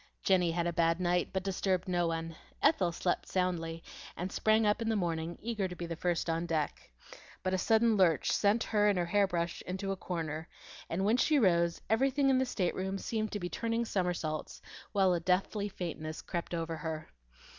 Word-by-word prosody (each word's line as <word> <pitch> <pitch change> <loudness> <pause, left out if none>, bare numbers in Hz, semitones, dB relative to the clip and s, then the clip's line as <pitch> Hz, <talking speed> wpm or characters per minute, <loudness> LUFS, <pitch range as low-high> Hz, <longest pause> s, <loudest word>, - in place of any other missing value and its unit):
Jenny 180 -3 +3
had 170 +1 0
a 175 - 0
bad 165 +1 +2
night, 175 0 +1
but 190 -1 -2
disturbed 190 -1 0
no 175 -2 +1
one. 165 0 -3 0.2
Ethel 185 - +3
slept 175 +1 -1
soundly, 165 -3 -1 0.3
and 180 +2 -3
sprang 220 0 +3
up 210 +3 +2
in 225 - 0
the 225 - +2
morning, 170 -3 -2
eager 220 -4 -2
to 180 - -7
be 175 - -5
the 165 0 -4
first 175 0 -1
on 165 +1 -1
deck. 155 -3 -2 0.5
But 185 0 0
a 185 - +1
sudden 225 +2 +3
lurch 170 -5 +3
sent 210 +3 +3
her 210 -1 +2
and 205 -2 +3
her 175 - +1
hair 200 +3 +3
brush 170 -2 -2
into 190 +2 -3
a - - -1
corner: 160 -3 -4 0.4
and 185 +4 -1
when 220 +4 +3
she 300 +3 +3
rose, 170 -7 +3
everything 270 +4 +3
in 260 - +4
the 260 - +1
stateroom 190 -2 -1
seemed 215 +2 -2
to 205 - -2
be 175 - -3
turning 230 +3 -1
somersaults, 175 -6 -2 0.3
while 195 -3 +3
a 175 - +1
deathly 195 +4 0
faintness 160 -4 -5
crept 175 -1 -3
over 165 -1 -3
her. 155 -1 -5
180 Hz, 200 wpm, -32 LUFS, 170-205 Hz, 0.5 s, in